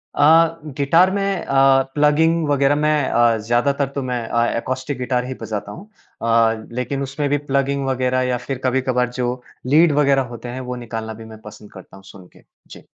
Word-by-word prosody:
अ, -, -, 0 dB, 0.6 s
guitar 165 Hz, +7 st, +4 dB
में 195 Hz, -2 st, -2 dB
अ, 135 Hz, 0 st, +4 dB
plugging 155 Hz, +2 st, +2 dB
वग़ैरह 140 Hz, 0 st, +2 dB
मैं 150 Hz, +1 st, +1 dB, 0.2 s
अ, 115 Hz, -1 st, +3 dB
ज़्यादातर 125 Hz, +5 st, 0 dB
तो 140 Hz, -, -1 dB
मैं 125 Hz, -1 st, -3 dB
अ, 115 Hz, 0 st, +1 dB
एकॉस्टिक 130 Hz, +3 st, -4 dB
गिटार 125 Hz, 0 st, -1 dB
ही 130 Hz, -, -5 dB
बजाता 105 Hz, -2 st, -5 dB
हूँ। 200 Hz, -, -11 dB, 0.3 s
अ, 115 Hz, -1 st, +2 dB
लेकिन 125 Hz, +3 st, -3 dB
उसमें 140 Hz, +2 st, -3 dB
भी 145 Hz, -, +2 dB
प्लगिंग 140 Hz, 0 st, 0 dB
वग़ैरह 130 Hz, 0 st, 0 dB
या 125 Hz, -, 0 dB
फिर 135 Hz, -, -2 dB
कभी-कभार 125 Hz, -1 st, 0 dB
जो 125 Hz, 0 st, -2 dB, 0.3 s
लीड 155 Hz, +4 st, +5 dB
वगैरह 140 Hz, -1 st, +3 dB
होते 120 Hz, +1 st, -8 dB
हैं, 130 Hz, +2 st, -6 dB
वो 125 Hz, 0 st, -5 dB
निकालना 115 Hz, -2 st, -6 dB
भी 110 Hz, +1 st, -11 dB
मैं 110 Hz, -1 st, -12 dB
पसंद 105 Hz, -1 st, -13 dB
करता 95 Hz, -, -14 dB
हूँ 95 Hz, -, -16 dB
सुन 95 Hz, -1 st, -14 dB
के। -, -, -20 dB, 0.2 s
जी। -, -, -13 dB
130 Hz, 190 wpm, -20 LUFS, 115-140 Hz, 0.6 s, लीड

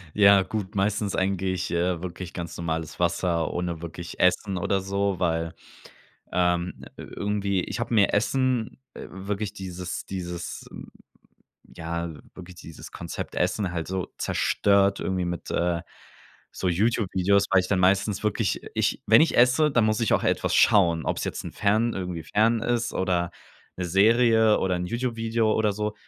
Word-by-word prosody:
Ja, 100 Hz, -1 st, +6 dB
gut. 100 Hz, +1 st, -5 dB
Meistens 100 Hz, 0 st, 0 dB
eigentlich, 95 Hz, -1 st, -1 dB
äh, 85 Hz, 0 st, 0 dB
wirklich 90 Hz, 0 st, -7 dB
ganz 85 Hz, -2 st, -6 dB
normales 80 Hz, -1 st, -4 dB
Wasser 85 Hz, -1 st, 0 dB
ohne 85 Hz, -2 st, -3 dB
wirklich 85 Hz, +1 st, -8 dB
Essen 95 Hz, +1 st, +2 dB
oder 95 Hz, +2 st, 0 dB
so, 100 Hz, 0 st, -1 dB
weil, 80 Hz, -2 st, -1 dB, 0.8 s
ähm, 90 Hz, 0 st, +1 dB, 0.2 s
irgendwie 100 Hz, -2 st, -2 dB
ich -, -, -5 dB
hab 120 Hz, -, -3 dB
mir 105 Hz, -4 st, +3 dB
Essen, 125 Hz, +2 st, 0 dB, 0.2 s
wirklich 100 Hz, +2 st, -5 dB
dieses 90 Hz, -1 st, -6 dB
dieses, 90 Hz, -2 st, -6 dB, 1.0 s
ja, 85 Hz, 0 st, -5 dB, 0.2 s
wirklich 90 Hz, -1 st, -11 dB
dieses 80 Hz, -3 st, -11 dB
Konzept -, -, -6 dB
Essen 95 Hz, -5 st, -1 dB
halt 85 Hz, -1 st, -4 dB
so 95 Hz, -1 st, -3 dB
zerstört 100 Hz, -1 st, +2 dB
irgendwie 95 Hz, -1 st, -1 dB
mit, 85 Hz, -1 st, -5 dB
äh, 85 Hz, -1 st, 0 dB, 0.7 s
so 95 Hz, -, -2 dB
YouTube-Videos, 100 Hz, 0 st, +2 dB
weil 95 Hz, -1 st, +5 dB
ich 90 Hz, -, -5 dB
dann 100 Hz, -, +1 dB
meistens 100 Hz, +3 st, +2 dB
wirklich 105 Hz, -, 0 dB
ich -, -, 0 dB
wenn 110 Hz, +2 st, +7 dB
ich 165 Hz, -, +3 dB
esse, 130 Hz, +5 st, +5 dB
dann 120 Hz, -5 st, +3 dB
muss 110 Hz, +1 st, +1 dB
ich 115 Hz, -, +2 dB
auch -, -, +1 dB
etwas -, -, 0 dB
schauen, 85 Hz, -, +4 dB
ob's -, -, -1 dB
jetzt -, -, -4 dB
'n -, -, -6 dB
Fern 110 Hz, +3 st, +1 dB
irgendwie 90 Hz, -3 st, -4 dB
Fern 110 Hz, +6 st, +2 dB
ist 120 Hz, -1 st, -1 dB
oder 90 Hz, -2 st, 0 dB, 0.5 s
'ne 90 Hz, -, -3 dB
Serie 110 Hz, +3 st, +4 dB
oder 90 Hz, -1 st, 0 dB
'n 90 Hz, 0 st, -3 dB
YouTube-Video 115 Hz, -1 st, -1 dB
oder 105 Hz, -2 st, +1 dB
so. 105 Hz, +1 st, -3 dB
95 Hz, 155 wpm, -25 LUFS, 90-105 Hz, 1.0 s, wenn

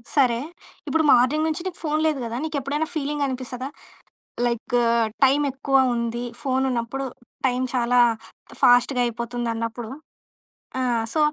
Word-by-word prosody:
సరే. 250 Hz, -5 st, +4 dB, 0.5 s
ఇప్పుడు 320 Hz, 0 st, +2 dB
మార్నింగ్ 255 Hz, +6 st, +4 dB
నుంచి 315 Hz, +2 st, -2 dB
నీకు 370 Hz, -2 st, -4 dB
ఫోను 305 Hz, 0 st, 0 dB
లేదు 305 Hz, -3 st, 0 dB
కదా! 230 Hz, 0 st, -4 dB
నీకెప్పుడైనా 300 Hz, 0 st, -2 dB
ఫీలింగనిపిస్తదా? 270 Hz, -3 st, -2 dB, 0.8 s
లైకు 240 Hz, +1 st, 0 dB, 0.4 s
టైమెక్కువ 275 Hz, 0 st, +2 dB, 0.2 s
ఉంది 235 Hz, +1 st, -2 dB, 0.2 s
ఫోనున్నప్పుడు 265 Hz, -1 st, -1 dB, 0.4 s
టైం 250 Hz, 0 st, 0 dB
చాలా 245 Hz, 0 st, +2 dB, 0.6 s
ఫాస్ట్‌గా 245 Hz, +1 st, +5 dB
అయిపోతుందన్నప్పుడు 230 Hz, -1 st, -3 dB, 0.9 s
ఆ! -, -, 0 dB, 0.3 s
సో 315 Hz, -, +1 dB
255 Hz, 105 wpm, -23 LUFS, 240-285 Hz, 0.9 s, ఫాస్ట్‌గా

